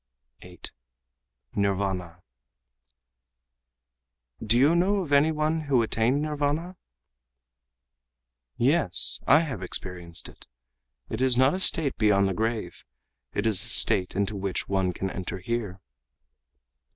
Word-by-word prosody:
8. 90 -1 -12 0.8
Nirvâna 95 -3 -2 2.2
"Do 110 +2 +3
you 145 +6 +4
know 195 +3 +1
of 150 - -9
any 145 +3 +4
one 155 +1 -1
who 130 -5 +2
attained 120 +6 0
Nirvâna?" 150 +4 -2 1.8
"Yes, 130 - +2
I 150 +3 +6
have 135 - -5
experienced 90 -2 -3
it. - - -15 0.6
It 110 - -4
is 130 -2 +3
not 130 +2 +4
a 185 - -3
state 160 -6 +4
beyond 100 -2 +3
the 95 - -2
grave. 110 -4 -4 0.5
It 105 - -1
is 105 -3 +2
a - - -4
state 95 -5 +2
into 100 +1 -1
which 95 -1 -4
one 95 -2 0
can 95 +2 -5
enter 95 0 -6
here." 100 -1 -4
110 Hz, 120 wpm, -26 LUFS, 95-145 Hz, 2.2 s, I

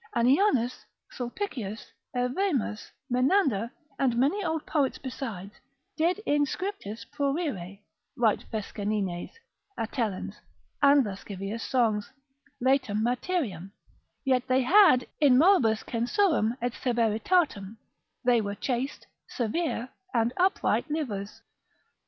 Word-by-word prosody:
Annianus, 255 - +3 0.3
Sulpicius, 240 - -5 0.2
Evemus, 250 - -1 0.2
Menander, 255 - +2 0.3
and 250 -4 +2
many 300 +12 +2
old 320 -3 -2
poets 285 -4 0
besides, 225 -7 -6 0.4
did 335 +4 +2
in 290 0 +3
scriptis 250 - -5
prurire, 275 - -2 0.4
write 225 -4 +2
Fescennines, 205 -4 -3 0.5
Atellans, 220 -4 -3 0.4
and 280 -2 +6
lascivious 200 +2 -5
songs; 225 -5 +1 0.5
laetam 255 -5 +2
materiam; 240 - -2 0.5
yet 255 -2 +2
they 255 0 +3
had 320 -5 +6
in 275 -4 +6
moribus 265 - +4
censuram, 245 - +1
et 245 -1 0
severitatem, 230 - +1 0.5
they 240 -2 +4
were 200 -1 -3
chaste, 255 +4 -3 0.2
severe, 255 +1 -2 0.3
and 230 +1 +2
upright 365 -3 +1
livers. 220 -10 -4
245 Hz, 100 wpm, -28 LUFS, 215-290 Hz, 0.5 s, and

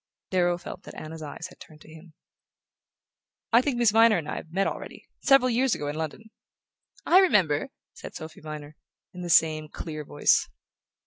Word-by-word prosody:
Darrow 175 -2 +2
felt 180 - -9
that - - -12
Anna's 160 +1 -8
eyes 155 +2 -7
had - - -18
turned 155 -1 -15
to 155 - -15
him. 160 0 -15 1.4
"I 235 - +7
think 255 -2 -1
Miss 240 -3 +4
Viner 225 -1 +5
and 160 -3 -5
I - - -4
have 160 - -9
met 195 +3 +1
already - - -6 0.2
several 270 -2 +5
years 255 +1 +2
ago 145 - -5
in 145 - -4
London." 160 +8 -6 0.7
"I 360 - +6
remember," 205 - +3 0.2
said - - -10
Sophy 160 0 -9
Viner, 150 -1 -8 0.4
in 180 - -8
the 175 - -5
same 155 -2 +3
clear 155 -1 -6
voice. - - +2
170 Hz, 180 wpm, -26 LUFS, 155-225 Hz, 1.4 s, I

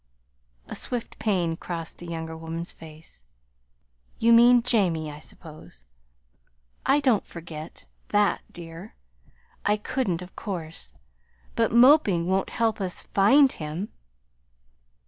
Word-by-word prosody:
A - - -7
swift 245 -2 -5
pain 180 -6 0
crossed 165 -1 -6
the 175 - -9
younger 160 -1 -5
woman's 165 +1 -5
face. 155 - -13 0.9
"You 230 +1 +4
mean 240 +1 +7
Jamie, 175 -10 +1
I 145 - -10
suppose. 150 - -13 1.0
I 275 +2 +5
don't 255 -8 +2
forget 160 -2 -10 0.2
that, 205 -1 +2
dear. 170 +3 -10 0.7
I 210 +1 +2
couldn't, 205 -5 -2
of 180 - -14
course. 165 - -6 0.6
But - - +2
moping 235 - +5
won't 190 +2 0
help 225 -3 0
us 185 -2 -4
find 265 +8 +5
him." 160 +6 -5
180 Hz, 115 wpm, -26 LUFS, 165-225 Hz, 1.0 s, mean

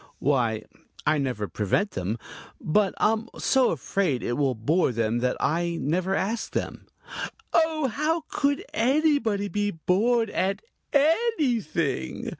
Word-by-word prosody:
"Why, 120 -6 +1 0.4
I 155 0 +3
never 125 -7 -2
prevent 110 - 0
them, 95 +5 -3 0.4
but 195 +4 +1
I'm 225 +2 +1
so 265 -2 +3
afraid 160 -2 -1
it 120 - -1
will 135 -1 +1
bore 145 +8 +2
them 115 0 0
that 125 +1 0
I 170 +2 0
never 180 +6 0
ask 215 +5 -2
them." - - -4 0.7
"Oh, 320 -2 +2
how 305 +7 0
could 285 0 0
anybody 250 -5 +2
be 205 0 -1
bored 210 +6 +1
at 195 - -1 0.3
anything?" 280 - +1
195 Hz, 125 wpm, -26 LUFS, -, 0.7 s, I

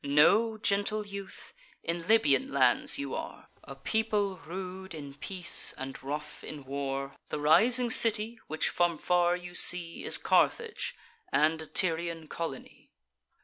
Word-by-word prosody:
Know, 205 +11 +3
gentle 210 +1 -1
youth, 200 -1 -9 0.3
in 170 0 -3
Libyan 215 - +3
lands 135 -2 +3
you 140 -1 -5
are: - - -7
A 135 - -10
people 205 +6 -1
rude 185 +2 -8
in 140 -3 -9
peace, 180 +5 -1
and 135 0 -7
rough 150 +3 -7
in 150 -2 -8
war. 135 0 -4
The - - -4
rising 230 +11 +4
city, 225 +1 +5
which 155 - -1
from 175 -2 0
far 175 +2 +1
you 180 0 -9
see, 175 -2 +1
Is - - +5
Carthage, 460 -1 0 0.4
and 160 +1 +2
a 160 - -9
Tyrian 165 -2 -1
colony. 165 -6 -7
170 Hz, 140 wpm, -29 LUFS, 150-200 Hz, 0.4 s, city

